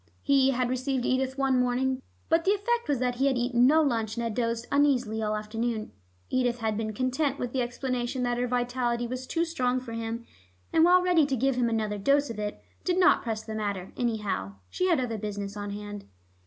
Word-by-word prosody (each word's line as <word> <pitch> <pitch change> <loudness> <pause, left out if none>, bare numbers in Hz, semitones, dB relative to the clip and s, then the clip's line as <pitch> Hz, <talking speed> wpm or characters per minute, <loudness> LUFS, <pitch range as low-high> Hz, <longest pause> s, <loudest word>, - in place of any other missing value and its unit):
He 275 -2 +4
had 250 -1 0
received 255 0 -1
Edith 265 +1 0
one 270 -2 +2
morning, 255 +1 +1 0.3
but 330 +1 +3
the 395 +3 +3
effect 470 +4 -1
was 285 - +2
that 245 0 -1
he 270 +2 +3
had 265 -2 +2
eaten 245 0 +3
no 315 +3 +5
lunch 225 -6 0
and 235 - -2
had 230 -2 -2
dozed 230 0 -1
uneasily 255 -6 +2
all 215 0 0
afternoon. 220 +1 -3 0.4
Edith 245 -2 +1
had 220 -2 -1
been 220 0 -2
content 260 +5 0
with 245 -3 -4
the 260 - +1
explanation 250 +1 -2
that 245 0 0
her 250 - 0
vitality 245 -1 0
was 255 +2 -5
too 335 0 0
strong 255 -7 0
for 245 -2 -8
him, 230 +1 -4 0.5
and, 325 - +5
while 360 +1 +6
ready 345 -5 +4
to 270 - 0
give 270 +2 +2
him 245 -2 +1
another 215 -2 -1
dose 280 +5 +2
of 215 - -7
it, 210 0 -4 0.2
did 360 -1 0
not 365 - +5
press 220 -2 -3
the 220 - -6
matter; 200 -4 -3
anyhow, 210 - -2 0.2
she 370 - 0
had 340 -5 +3
other 230 -4 -2
business 205 -1 -4
on 205 0 -5
hand. 205 0 -7
245 Hz, 215 wpm, -28 LUFS, 225-270 Hz, 0.5 s, while